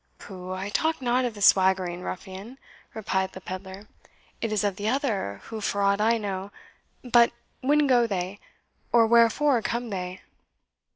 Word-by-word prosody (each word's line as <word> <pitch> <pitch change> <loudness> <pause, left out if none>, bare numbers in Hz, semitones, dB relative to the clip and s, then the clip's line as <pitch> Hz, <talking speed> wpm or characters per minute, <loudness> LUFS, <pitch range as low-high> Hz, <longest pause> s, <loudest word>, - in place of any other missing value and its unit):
"Pooh 185 -1 -9
I 190 +2 -4
talk 320 +9 0
not 250 0 +1
of 235 -3 -3
the 205 - -4
swaggering 185 -2 +4
ruffian," 195 +7 -7 0.4
replied 190 -3 -1
the - - -8
pedlar; 190 +2 -8 0.5
"it 225 - -2
is 215 -1 0
of 200 -2 0
the 205 +2 -2
other, 220 - -1
who, 220 -1 -7
for 200 0 -1
aught 200 +1 +2
I 230 +2 +3
know 200 -2 -4 0.5
But 240 -1 +5 0.3
when 295 +3 +3
go 245 -3 +4
they? 190 -1 -3 0.5
or 235 -1 +5
wherefore 235 +3 +4
come 235 +1 -3
they?" 180 -1 -5
205 Hz, 160 wpm, -26 LUFS, 190-235 Hz, 0.5 s, But